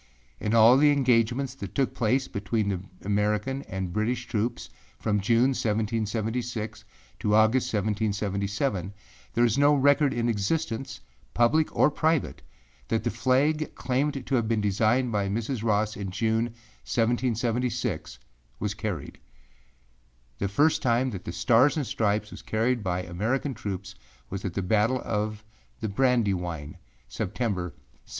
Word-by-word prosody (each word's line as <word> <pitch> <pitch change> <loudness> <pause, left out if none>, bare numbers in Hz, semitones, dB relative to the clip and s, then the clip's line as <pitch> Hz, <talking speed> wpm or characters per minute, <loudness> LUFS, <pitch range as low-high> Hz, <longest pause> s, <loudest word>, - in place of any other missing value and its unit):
In 110 +1 0
all 115 +3 +7
the 150 +2 +5
engagements 130 -1 +2
that 100 -8 -8
took 135 -2 +1
place 125 +3 +1
between 105 +1 -1
the 95 -3 -1 0.2
American 105 +6 0
and 95 -2 -4
British 120 +3 -1
troops 120 0 -2 0.3
from 105 -2 0
June, 115 +5 +3
1776, 110 -1 -2 0.4
to 105 0 +2
August, 110 +4 +3
1777, 100 -1 -1 0.4
there 120 +1 +4
is 120 +3 +1
no 145 +1 +5
record 145 +1 +4
in 120 0 -1
existence, 115 - -2 0.3
public 150 +7 +4
or - - +4
private, 160 0 0 0.5
that 110 -1 0
the 120 - 0
flag 145 +4 +1
claimed 135 +1 -1
to - - -4
have 120 -4 +2
been 115 -1 +1
designed 110 +5 +2
by 100 -2 0
Mrs. 115 +3 -2
Ross 110 -1 +1
in 100 -4 -4
June, 110 +4 +1 0.4
1776, 120 - -1 0.4
was 105 0 -1
carried. 100 -7 -5 1.2
The 100 - 0
first 145 +11 +2
time 125 0 +2
that 95 -4 -7
the - - -4
Stars 120 - +3
and 145 - 0
Stripes 105 -2 0
was - - -9
carried 115 +2 0
by 90 -2 -1
American 110 +11 -1
troops 95 -4 -5 0.4
was 95 0 -4
at 90 - -4
the 100 - -1
battle 110 +7 +2
of 105 0 -2 0.4
the 110 - -2
Brandywine, 95 - 0 0.3
September, 100 -8 -2
1777. 80 -6 -11
110 Hz, 140 wpm, -27 LUFS, 105-125 Hz, 1.2 s, all